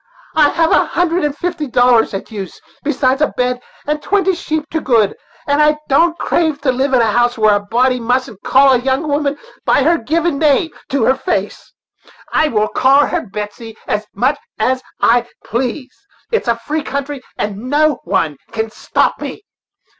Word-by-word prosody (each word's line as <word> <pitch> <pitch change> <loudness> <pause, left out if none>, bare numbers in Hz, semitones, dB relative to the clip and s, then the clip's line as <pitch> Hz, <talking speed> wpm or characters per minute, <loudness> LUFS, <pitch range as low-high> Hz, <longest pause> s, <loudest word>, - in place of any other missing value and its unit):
I 300 -2 +5
have 325 -1 +1
a - - +5
hundred 350 0 0
and 295 0 -2
fifty 345 -4 -3
dollars 245 -4 +3
at 195 - -6
use, 195 -4 -7 0.2
besides 275 -2 0
a 300 - +4
bed 250 0 -2 0.2
and 300 +1 -1
twenty 385 0 +1
sheep, 315 -3 -3
to 320 - -1
good; 225 -6 +2 0.3
and 285 +1 +2
I 300 0 +4
don't 330 +5 +3
crave 315 -4 0
to 270 -2 +2
live 265 +1 0
in 245 - +4
a 225 -2 +2
house 240 +2 +2
where 215 -1 +4
a 205 - +2
body 245 +5 +1
mustn't 235 -3 -1
call 270 +1 +5
a 250 - +3
young 265 +4 -1
woman 290 0 0 0.3
by 280 - +3
her 335 +3 +3
given 320 +4 0
name 310 +1 +2 0.2
to 275 -3 0
her 260 - +4
face. 265 +7 -3 0.6
I 310 - +3
will 215 -6 0
call 275 +2 +4
her 345 -8 -3
Betsey 210 +2 -7
as 210 0 -2
much 275 +4 +1 0.2
as 255 +4 0 0.2
I 240 +1 +3 0.2
please; 255 +3 -3 0.4
it's 455 - 0
a 235 - +3
free 295 +7 -3
country, 280 -1 -4 0.2
and 210 +4 -4
no 300 -1 +2
one 170 -5 -1
can 220 0 -3
stop - - 0
me. 415 - -6
265 Hz, 185 wpm, -16 LUFS, 235-300 Hz, 0.6 s, I